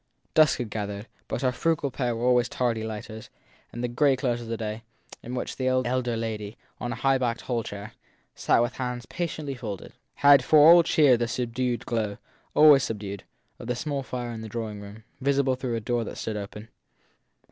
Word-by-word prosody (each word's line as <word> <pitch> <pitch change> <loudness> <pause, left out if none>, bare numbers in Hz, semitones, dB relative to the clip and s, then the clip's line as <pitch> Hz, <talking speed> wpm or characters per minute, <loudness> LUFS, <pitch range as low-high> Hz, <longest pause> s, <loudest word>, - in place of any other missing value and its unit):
Dusk 155 -2 +5
had 120 -4 -5
gathered, 105 0 -4 0.2
but 120 - -3
our 130 - +3
frugal 150 +1 0
pair 125 -2 -1
were 115 +2 -2
always 125 -1 +3
tardy 115 -3 -1
lighters, 110 0 -7 0.4
and 120 - -6
the - - +1
grey 135 +3 +3
close 125 -2 -1
of 115 -1 -4
day, 110 0 -4 0.4
in 125 +2 -6
which - - -4
the 130 - -1
elder 130 -2 0
lady, 110 -2 -4 0.2
on 120 - -3
a - - -3
high 135 -1 +2
backed 120 -2 -1
hall 120 -2 -1
chair, 105 +1 -8 0.4
sat 115 - +2
with 120 0 -3
hands 125 -2 -4
patiently 155 -5 -4
folded, 110 -7 -7 0.2
had 140 -2 +6
for 155 - +4
all 165 +4 +9
cheer 150 -6 +4
the 120 0 -1
subdued 125 0 -2
glow 110 -3 -2 0.4
always 150 -2 +8
subdued 100 -4 -5 0.3
of - - -8
the 125 - -1
small 140 +2 -3
fire 125 -2 -5
in 115 -1 -6
the 110 - -7
drawing 110 -2 -5
room, 105 +2 -11 0.2
visible 140 0 +2
through 125 -2 -3
a - - -1
door 120 +2 -1
that - - -7
stood 110 - -4
open. 105 +2 -7
120 Hz, 195 wpm, -26 LUFS, 110-130 Hz, 0.4 s, all